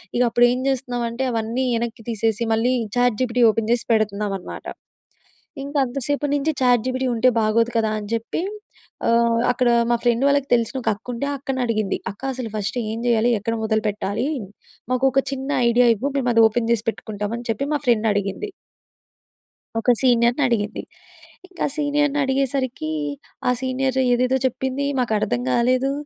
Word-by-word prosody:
ఇగ 245 - +2
అప్పుడు 240 +1 +4
ఏం 250 - -1
చేస్తున్నామంటే, 245 -2 -2
అవన్నీ 230 +3 -1 0.2
ఎనక్కి 230 -1 -5
తీసేసి 225 +1 0
మళ్ళీ 240 +3 +2 0.2
చాట్‌జీపిటీ 245 0 +2
ఓపెన్ 225 0 -2
చేసి 240 - -1
పెడుతున్నామనమాట. 205 -3 -2 1.0
ఇంకా 285 +1 -3
అంతసేపు 280 +3 -2
నుంచి 295 +2 +1
చాట్‌జీపిటీ 255 +1 +2
ఉంటే 240 +3 +3
బాగోదు 230 +2 +2
కదా 220 -1 +1
అని 205 0 -8
చెప్పి 230 +9 -2 0.7
ఆహ్, 230 0 +3
అక్కడ 250 0 +1 0.2
మా - - +4
ఫ్రెండ్ 240 +2 +2
వాళ్ళకి 280 -1 +1
తెలిసిన 235 +2 0
ఒక - - +1
అక్క 210 +4 -22
ఉంటే 280 +5 -3
ఆ - - -2
అక్కని 270 -1 -3
అడిగింది, 215 -4 0 0.2
అక్క 205 - -23
అసలు 245 -3 -5
ఫస్ట్ 215 +4 -2
ఏం 225 - -4
చేయాలి? 235 0 +3
ఎక్కడ 230 +3 -2
మొదలుపెట్టాలి? 215 +1 -1 0.7
మాకు 255 +1 +1
ఒక 270 - +4
చిన్న 270 +1 -4 0.2
ఐడియా 245 +1 +4
ఇవ్వు 275 +7 -2
మేము 250 -2 0
అది 230 - +6
ఓపెన్ 225 +1 -2
జేసి 225 -2 0
పెట్టుకుంటామని 220 +2 -5
చెప్పి 225 +5 -1
మా - - +1
ఫ్రెండ్ 225 -2 +3
అడిగింది. 200 - -2 1.3
ఒక 245 - +3
సీనియర్‌ని 245 +2 +3
అడిగింది. 215 -3 -1 0.7
ఇంక 365 -2 -19
ఆ - - -4
సీనియర్‌ని 290 -1 +1
అడిగేసరికి 265 - -1 0.6
ఆ - - +5
సీనియర్ 260 0 -1
ఏదేదో 255 +2 +2
చెప్పింది. 265 +2 -1
మాకర్థం 215 - 0
కాలేదు. 255 - +2
240 Hz, 155 wpm, -22 LUFS, 225-260 Hz, 1.3 s, అది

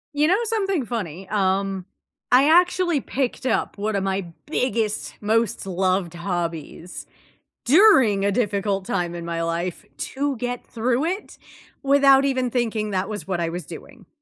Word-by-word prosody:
You 300 +3 +3
know 410 +6 +3
something 390 - 0
funny, 190 -6 -5
um, 195 -2 0 0.5
I 265 +4 +6
actually 350 -3 +3
picked 260 -1 -3
up 260 - 0
one 205 0 -1
of 195 - -1
my 190 -1 -2 0.2
biggest, 225 -7 -1
most 220 -1 0
loved 185 -1 0
hobbies 175 -1 -5 0.6
during 260 - +5
a 200 - +2
difficult 200 -3 0
time 175 -3 -2
in 170 -1 -6
my 165 0 -2
life 170 +1 -3
to 280 0 -2
get 245 +1 -4
through 245 +5 -1
it 380 +5 -4 0.5
without 275 0 +5
even 260 -2 0
thinking 225 -3 -1
that 190 -1 -1
was 210 -2 -6
what 185 -2 -1
I 170 -1 -1
was 175 -2 -6
doing. - - -11
215 Hz, 150 wpm, -23 LUFS, 185-270 Hz, 0.6 s, I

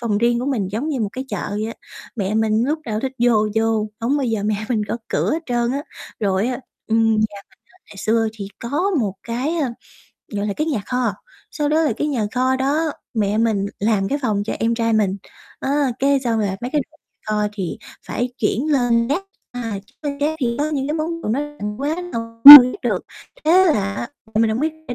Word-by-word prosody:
phòng 215 -4 0
riêng 235 +1 +2
của 260 - -3
mình 220 -9 -1
giống 240 +9 -3
như 275 -5 -2
một 210 - 0
cái 260 +1 -5
chợ - - -4
vậy 210 +1 -2
á, 230 - -6 0.4
mẹ 200 -1 -2
mình 220 +1 +2
lúc 305 +3 -1
nào 215 -1 -2
thích 265 +1 -3
vô 225 -3 +3
vô, 220 -1 +1
hổng 245 +5 0
bao 280 - -1
giờ 220 -3 -1
mẹ 215 0 +1
mình 225 -4 0
gõ - - -2
cửa - - 0
hết 325 +2 -2
trơn 240 0 0
á. 280 - -3 0.4
Rồi 195 +1 +1
á 255 0 -3 0.3
ừm, 225 0 +2
nhà 220 - +2 0.3
mình - - -28 0.2
á - - -25
ngày 200 - -14
xưa 225 +2 +1
thì 200 -3 -7
có 295 +12 -1
một 205 -6 -1
cái, 255 +8 -2
ơ, 280 -6 0 0.6
gọi 205 0 -2
là 205 - -1
cái 305 - -1
nhà 280 -9 -1
kho, 250 -4 0 0.4
sau 295 -1 -2
đó 310 +2 +2
là 300 - +1
cái - - -1
nhà 235 -7 -1
kho 255 +1 +1
đó 295 +4 0 0.2
mẹ 210 -1 0
mình 220 -3 +1
làm 205 -2 +1
cái 285 - -1
phòng 210 -4 0
cho - - -3
em 230 +1 +1
trai 230 -1 0
mình. 205 -3 +1 0.4
Á, 280 -1 0
cái 275 0 +2
xong 235 -3 -1
rồi 210 -2 0
mấy 245 - -4
cái 300 - +1
đồ 315 - -25
nhà - - -57
kho 210 -1 0
thì 190 -5 -5 0.3
phải 245 +1 -3
chuyển 260 +8 0
lên 240 -3 +2
gác. 325 +8 0 0.3
À, 230 -5 -4
chuyển - - -30
lên 280 - -11
gác 305 +2 0
thì 235 -2 0
có 300 +2 0
những 275 -2 -2
cái 300 - -1
món 330 +1 -3
đồ - - -4
nó 245 +6 0 0.2
ừm, 210 0 -4
quá 290 +3 -1 0.2
rồi 230 - -2 0.4
chưa 285 - +11
biết 250 +1 -3
được - - -1 0.4
thế 365 +4 +5
là 200 - +1
á, 235 - -5 0.3
mẹ 225 +1 +3
hông 220 +4 -1
biết 315 +1 0 0.2
để 245 - -3
235 Hz, 240 wpm, -20 LUFS, 215-280 Hz, 0.6 s, chưa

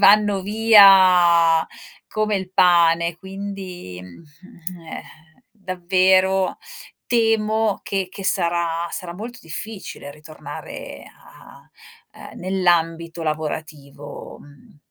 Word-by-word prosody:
vanno 205 -1 +5
via 185 -6 +6 0.4
come 215 -1 -1
il 190 -1 -6
pane, 170 -2 +3
quindi 190 - -8
eh, 165 - -11 0.5
davvero 185 -1 +1 0.5
temo 220 -2 +1
che 195 -2 -3
che 195 - -9
sarà 170 -2 -1
sarà 175 -3 -7
molto 235 +5 -8
difficile 170 -2 -8
ritornare 155 +1 -10
a, - - -18 0.6
ehm, - - -12
nell'ambito 170 -3 0
lavorativo, 150 -2 -6
mhmm, 145 0 -19
180 Hz, 85 wpm, -21 LUFS, 165-195 Hz, 0.6 s, via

